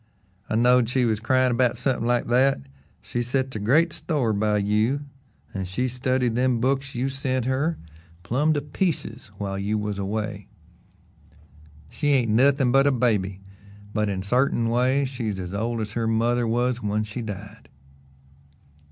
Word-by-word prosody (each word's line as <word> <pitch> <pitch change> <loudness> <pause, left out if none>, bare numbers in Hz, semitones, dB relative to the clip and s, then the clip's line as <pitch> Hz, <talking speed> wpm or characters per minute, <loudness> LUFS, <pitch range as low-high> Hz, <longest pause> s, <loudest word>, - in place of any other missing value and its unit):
"I - - 0
knowed 120 0 +4
she 130 -1 +1
was 110 -3 +1
cryin' 130 +2 +2
'bout 125 -1 +2
something 125 -3 -1
like 120 0 +1
that. 130 +3 +3 0.4
She 120 - -3
sets 130 +1 -1
a - - -2
great 150 +11 +3
store 135 -9 -1
by 105 0 +1
you, 105 +7 +1 0.5
an' 95 -1 -3
she's 125 +7 -2
studied 125 -1 0
them 125 0 +1
books 135 +2 -1
you 125 +3 0
sent 130 -2 -1
her 145 +5 0 0.5
plum' 140 - +1
to 145 - -1
pieces 145 - -3
while 95 -1 -3
you 105 +2 -1
was 105 -1 -3
away. 105 0 -3 1.4
She 145 - -2
ain't 130 -6 +3
nothin' 135 +2 +3
but 135 +2 +4
a - - +4
baby, 105 -7 0 0.5
but 105 -1 0
in 95 -1 -3
sartain 120 +1 +1
ways 130 +4 +2
she's 115 -6 -4
as 90 0 -6
old 115 +3 -2
as 105 -1 -4
her 115 0 -1
mother 115 +2 +1
was 120 +2 0
when 105 0 0
she 110 +3 -6
died." 105 0 -8
120 Hz, 160 wpm, -24 LUFS, 105-130 Hz, 1.4 s, knowed